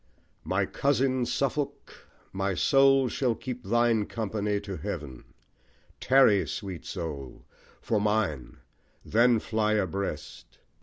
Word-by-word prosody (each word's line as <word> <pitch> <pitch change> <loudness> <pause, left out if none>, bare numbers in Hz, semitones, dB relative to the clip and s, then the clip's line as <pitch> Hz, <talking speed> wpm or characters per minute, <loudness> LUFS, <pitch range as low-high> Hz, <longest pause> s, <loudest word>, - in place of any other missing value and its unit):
My - - 0
cousin 130 -3 0
Suffolk, 140 +1 -3 0.3
My 95 0 -1
soul 135 +2 +4
shall 125 -2 0
thine 120 -2 0
keep 105 - -5
company 105 -2 -2
to 100 -2 -6
heaven 70 -4 -6 0.7
Tarry, 130 -7 +4
sweet 95 -5 -6
soul, 70 -6 -6 0.4
for 110 -3 0
mine, 105 - -1 0.5
then 120 +2 +4
fly 110 -1 0
abreast. 95 - -4
110 Hz, 105 wpm, -28 LUFS, 95-125 Hz, 0.7 s, soul